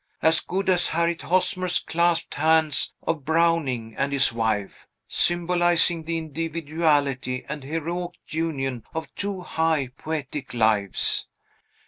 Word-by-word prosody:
As 160 +1 +5
good 195 +2 -3
as 180 -2 +4
Harriet 170 +1 0
Hosmer's 185 0 +2
clasped 170 0 0
hands 160 -1 +2
of 160 -3 -2
Browning 155 -8 +1
and 140 0 -1
his 135 -4 +4
wife, 110 -4 -2 0.2
symbolizing 175 -1 +2
the 165 0 -1
individuality 155 -4 -1
and 145 -1 -5
heroic 165 +4 -3
union 135 -7 -3
of 160 0 -5
two 200 -2 -3
high, 160 -6 0
poetic 145 -4 -5
lives! 110 -4 +2
160 Hz, 115 wpm, -24 LUFS, 140-170 Hz, 0.2 s, As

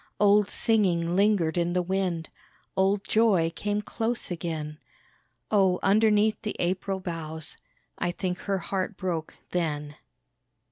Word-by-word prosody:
Old 205 0 +5
singing 180 -6 +2
lingered 190 -5 +3
in 175 0 0
the 180 0 +1
wind, 180 -3 -1 0.5
Old 195 +1 +2
joy 200 -7 +3
came 210 0 -1
close 230 -1 -2
again, 155 -3 -4 0.7
Oh, 190 -4 +4
underneath 215 +1 +3
the 215 - -4
April 190 +2 -1
boughs, 160 -3 -5 0.4
I 175 - 0
think 180 0 -3
her 195 -1 -1
heart 190 +2 -3
broke 170 -4 -3 0.2
then. 150 -4 -2
185 Hz, 125 wpm, -27 LUFS, 170-205 Hz, 0.7 s, Old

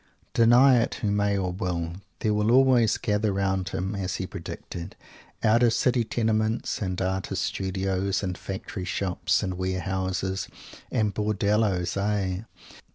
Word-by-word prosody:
Deny 120 +2 +6
it, 115 - -1
who 105 - -1
may 100 0 +1
or 95 -2 -1
will. 85 -2 -3 0.3
There 105 - +2
will 105 +1 +1
always 125 -3 +5
gather 105 0 0
round 95 -2 0
him 95 +4 -3
as 95 -2 -2
he 95 - -3
predicted 90 -1 -7 0.5
out 110 +2 +4
of 120 -2 +4
City 125 -1 +2
Tenements 110 0 0
and 95 -2 -2
Artist 95 0 -1
Studios 95 +1 -1
and 90 -2 -2
Factory 95 +1 -6
Shops 90 -1 0
and 95 -2 -3
Ware 95 0 -1
Houses 95 +1 -2 0.4
and 105 -2 +1
Bordelloes 105 -2 +1
aye! 100 -1 -1
100 Hz, 145 wpm, -26 LUFS, 95-110 Hz, 0.5 s, Deny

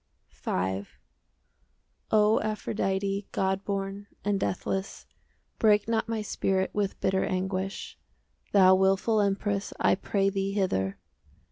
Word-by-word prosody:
V 95 +2 -2 1.2
O 215 0 +4
Aphrodite, 200 -2 -1
God 190 0 0
born 200 0 -3 0.2
and 205 -1 +1
deathless, 190 +1 -3 0.5
Break 210 -1 +4
not 225 0 0
my 225 -2 -1
spirit 190 -2 0
With 205 -2 -1
bitter 190 0 +1
anguish: 190 +1 -3 0.5
Thou 190 -2 +7
wilful 195 +3 +3
empress, 200 0 0
5 - - +3
I - - +5
pray 195 0 0
thee, 195 0 -1
hither! 100 - 0
195 Hz, 115 wpm, -28 LUFS, 190-205 Hz, 1.2 s, Thou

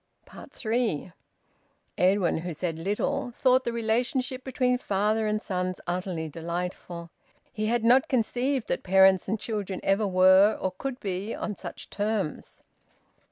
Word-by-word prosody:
THREE. 220 - -2 0.8
Edwin, 185 -2 +2
who 170 -1 -5
said 165 0 -3
little, 205 +6 -2
thought 260 0 +4
the 235 - 0
relationship 245 +3 -1
between 250 -1 0
father 215 +1 0
and 215 0 0
sons 185 -1 -2
utterly 175 -2 -3
delightful. 170 +1 -5 0.4
He 215 0 -2
had 235 0 +1
not 250 +3 +5
conceived 250 +1 0
that - - -1
parents 190 0 +5
and 215 +2 -1
children 205 -4 -3
ever 200 +2 +2
were 190 +2 +5
or 185 - -1
could 255 +7 -5
be 195 +2 -3
on 210 - -4
such - - -9
terms. 205 -5 -3
205 Hz, 135 wpm, -27 LUFS, 185-235 Hz, 0.8 s, not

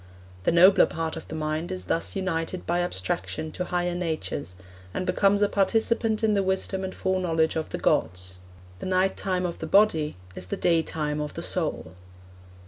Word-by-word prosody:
The - - +4
nobler 180 +4 +7
part 160 0 -3
of 160 - -8
the 160 - -6
mind 155 +2 -2
is 90 0 -4
thus 165 - -1
united 185 -2 -2
by 175 +1 +1
abstraction 95 - -2
to 180 - -4
higher 175 0 -1
natures, 160 - -3 0.4
and 185 - -1
becomes 200 +2 +3
a - - +5
participant 220 +2 +1
in 215 -1 +3
the 200 - +3
wisdom 190 0 -1
and 190 - -5
foreknowledge 175 -4 +1
of 160 -1 -2
the - - -3
gods.... 90 0 0 0.4
The - - -5
night 185 +1 +2
time 185 -2 -1
of 170 - -4
the 160 - -4
body 160 - +3 0.2
is 90 - -6
the - - -3
day 170 -2 +3
time 150 -2 -2
of 150 - -5
the 170 - -4
soul.' 155 - -2
175 Hz, 185 wpm, -26 LUFS, 155-190 Hz, 0.4 s, nobler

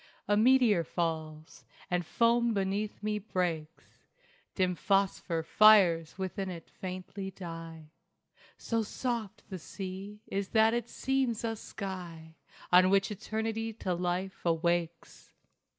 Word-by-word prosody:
A 205 - +3
meteor 225 -5 +5
falls, 160 -2 -4 0.3
and 180 0 +1
foam 235 +5 +2
beneath 200 +2 -2
me 210 0 -1
breaks; 170 -6 -4 0.5
Dim 185 -2 +2
phosphor 190 -3 0
fires 180 -5 +5
within 190 0 -3
it 170 -3 -9
faintly 185 +1 -6
die. 165 -4 -9 0.7
So 230 -1 -1
soft 225 -1 -4
the 185 - -5
sea 195 +4 -7
is 195 0 -3
that 220 +1 +5
it 235 -1 -2
seems 265 -4 -1
a 225 -1 -1
sky 180 -7 -7 0.4
On 180 +1 +7
which 195 +2 +3
eternity 220 +2 -3
to 190 -4 -2
life 180 +2 -2
awakes. 170 0 -1
190 Hz, 120 wpm, -31 LUFS, 170-215 Hz, 0.7 s, On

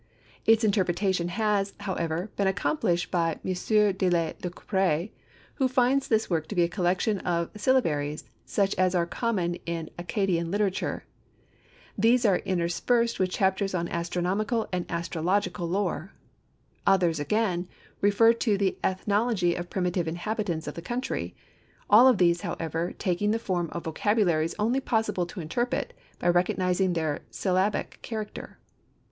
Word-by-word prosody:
Its 225 +1 +5
interpretation 190 -3 +1
has, 200 +1 0
however, 180 -1 -2
been 200 - +1
accomplished 180 - 0
by 165 -2 +1
M. - - 0
de 195 0 +2
Lacouperie 175 +1 -1 0.5
who 265 - +3
finds 255 +2 +2
this 220 -1 +2
work 160 -3 -1
to 210 - -6
be 175 - +4
a - - +2
collection 185 +3 0
of 170 -2 -2
syllabaries 160 - +1 0.2
such 200 -1 0
as 185 0 +3
are 170 -1 +2
common 180 -4 -1
in 165 -1 -4
Accadian 175 -2 0
literature. 200 0 -1 0.9
These 235 +4 +3
are 195 -4 +4
interspersed 190 +7 0
with 185 -1 +2
chapters 190 +1 0
on 170 -1 -1
astronomical 185 +6 -1
and 180 -1 -2
astrological 175 +2 -1
lore. 190 -1 -2 0.7
Others 175 -5 +3
again, 180 +2 0 0.3
refer 205 +3 +5
to 225 -3 +1
the 195 -1 0
ethnology 200 -1 +1
of 175 0 -5
primitive 180 -2 -1
inhabitants 175 0 -2
of - - -5
the 170 - -7
country; 245 +8 -3 0.6
all 230 +5 +9
of 255 -4 +5
these, 175 -1 +3
however, 170 -2 -3
taking 190 +1 0
the 220 - +2
form 180 -7 -2
of 170 - -5
vocabularies 165 -2 +1
only 230 +5 +1
possible 220 -8 0
to 180 +1 -7
interpret 240 +10 -2 0.2
by - - -2
recognizing 180 +1 +2
their 160 -3 -1
syllabic 190 +2 -1
character. 215 -2 -6
185 Hz, 140 wpm, -27 LUFS, 175-210 Hz, 0.9 s, all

